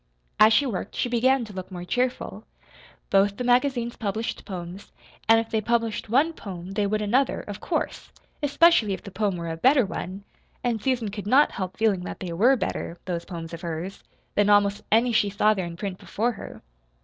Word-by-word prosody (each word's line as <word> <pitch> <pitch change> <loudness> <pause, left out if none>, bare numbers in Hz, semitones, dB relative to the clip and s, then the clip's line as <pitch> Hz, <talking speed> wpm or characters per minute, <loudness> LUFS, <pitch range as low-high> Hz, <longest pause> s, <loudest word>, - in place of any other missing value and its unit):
As 215 +1 +8
she 280 +6 +4
worked 205 -5 -4
she 245 - -1
began 250 +1 +2
to 210 - -11
look 185 -1 -6
more 175 -1 -6
cheerful. 250 +6 -2 0.7
Both 200 +1 +3
the - - -3
magazines 245 -1 +1
published 220 +1 -3
poems, 180 0 -7 0.4
and 225 0 +7
if 225 0 -4
they 220 - +1
published 230 -1 -1
one 285 +8 +3
poem 185 - -8
they 205 0 0
would 215 +1 0
another, 250 +7 +1
of - - -8
course, - - -3 0.3
especially 290 -7 +4
if 190 - -6
the 200 - -9
poem 200 0 0
were 170 -1 -4
a 160 - -5
better 260 - +4
one 195 0 -6 0.4
and 235 -3 0
Susan 245 -3 0
could 205 0 -6
not 270 +7 +5
help 185 -2 -5
feeling 220 -4 +2
that - - -6
they 180 -3 -5
were 235 +10 +4
better 185 -5 -3
(those 170 -2 -3
poems 170 -2 -7
of 165 - -7
hers) 170 +2 -5 0.3
than 205 0 +3
almost 205 0 +4
any 230 +3 +4
she 210 -2 +3
saw 210 +2 +3
there 190 -4 -3
in 170 0 -8
print 195 -1 -5
before 235 +4 -1
her. 220 - -10
210 Hz, 200 wpm, -25 LUFS, 190-240 Hz, 0.7 s, As